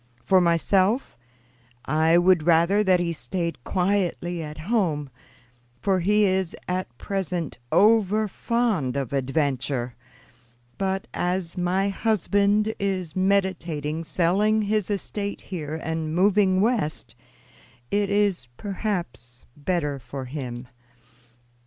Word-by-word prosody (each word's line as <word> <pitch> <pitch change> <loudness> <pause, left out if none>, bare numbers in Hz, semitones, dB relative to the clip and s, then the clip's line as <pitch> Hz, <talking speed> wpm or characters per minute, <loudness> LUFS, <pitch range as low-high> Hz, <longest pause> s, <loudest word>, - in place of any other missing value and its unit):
For 190 -1 +5
myself, 185 +7 +2 0.7
I 160 +3 +3
would 175 -1 +4
rather 170 +5 +4
that 185 -3 +4
he 170 -1 -1
stayed 165 0 -4
quietly 180 -2 0
at 150 -1 -7
home, 155 - -1 0.7
for 195 +3 +1
he 210 +4 +3
is 190 -2 0
at 180 -9 -3
present 180 -4 -3
over 215 0 +4
fond 210 - -1
of 135 -2 -3
adventure; 135 -2 -1 0.9
but 195 0 -1
as 180 -1 -2
my 185 +2 +1
husband 210 +1 +1
is 185 -5 -2
meditating 175 -5 0
selling 200 +6 +2
his 210 -1 0
estate 200 0 -3
here 155 -5 -5
and 160 0 -3
moving 190 0 +3
West, 195 - -1 0.8
it 205 -1 +1
is 200 -9 +1
perhaps 180 - -4
better 150 -2 -1
for 130 +2 -7
him. 125 -2 -6
180 Hz, 110 wpm, -25 LUFS, 155-200 Hz, 0.9 s, For